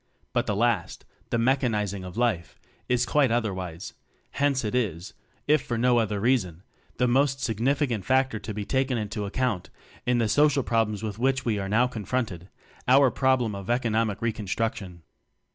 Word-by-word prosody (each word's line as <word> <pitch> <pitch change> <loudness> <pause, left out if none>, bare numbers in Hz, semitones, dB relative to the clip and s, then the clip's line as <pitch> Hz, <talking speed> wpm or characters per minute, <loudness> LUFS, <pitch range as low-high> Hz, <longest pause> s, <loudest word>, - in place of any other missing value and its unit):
But - - 0
the 105 - 0
last 115 -4 0 0.2
the - - 0
mechanizing 115 -6 0
of 90 +2 -8
life 110 -8 -1 0.3
is 125 0 +2
quite 140 0 +3
otherwise; 95 -7 -3 0.4
hence 140 -3 +1
it 105 - -2
is, 95 -8 -2 0.3
if 150 -1 +4
for 120 - -3
no 120 +1 +3
other 105 -2 -1
reason, 100 -7 0 0.3
the 125 - +2
most 135 +2 +2
sig 110 -5 -2
nificant 130 -4 +1
factor 130 -2 +1
to 110 - -6
be 105 -1 -4
taken 130 0 0
into 105 -1 -3
account 110 -4 -1 0.4
in 125 0 +3
the 115 -2 +2
social 145 +4 +3
problems 110 -3 0
with 105 -1 -4
which 135 +1 +1
we 110 -4 0
are 95 0 -4
now 115 +4 +4
confronted 110 -6 -3 0.4
our 130 0 +6
problem 130 -3 +1
of 100 0 -7
economic 115 -3 0
reconstruction. 105 -5 -3
115 Hz, 165 wpm, -26 LUFS, 105-130 Hz, 0.4 s, our